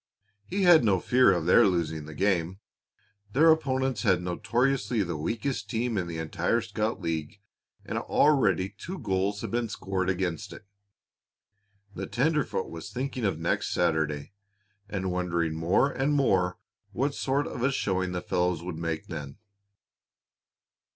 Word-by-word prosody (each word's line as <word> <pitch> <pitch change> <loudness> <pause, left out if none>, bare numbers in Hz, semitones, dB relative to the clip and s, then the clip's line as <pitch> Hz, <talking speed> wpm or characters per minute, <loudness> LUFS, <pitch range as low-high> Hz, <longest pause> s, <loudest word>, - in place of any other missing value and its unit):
He 195 +1 -1
had 175 -5 +7
no 100 -4 +3
fear 125 +7 +4
of 85 -3 0
their 90 - +6
losing 80 -4 -1
the 75 0 -9
game. 95 0 0 0.7
Their 160 +4 +6
opponents 130 -6 0
had 95 -5 +3
notoriously 115 +5 0
the 85 -3 -4
weakest 115 - -3
team 115 0 -1
in 90 -3 -1
the 85 -1 -5
entire 85 +7 0
scout 110 0 -2
league, 80 +1 -4 0.5
and - - -2
already 105 -11 +3
two 165 - -8
goals 95 - -1
had - - -5
been 120 -1 -1
scored 95 -2 -2
against 90 -4 -2
it. - - -12 1.3
The 95 0 -5
tenderfoot 150 -5 0
was 85 +4 -8
thinking 130 +1 -3
of 95 -6 0
next 85 - -1
Saturday, 75 +1 0 0.6
and 95 -3 -2
wondering 85 -3 -1
more 85 - +2
and 140 +2 0
more 95 -10 +2 0.4
what 140 +2 0
sort 140 +1 0
of - - -6
a 135 +3 +2
showing 95 -7 -1
the 90 -1 -4
fellows 90 -2 0
would 85 -3 -5
make 80 -1 -3
then. 70 +1 -7
95 Hz, 150 wpm, -28 LUFS, 85-125 Hz, 1.3 s, had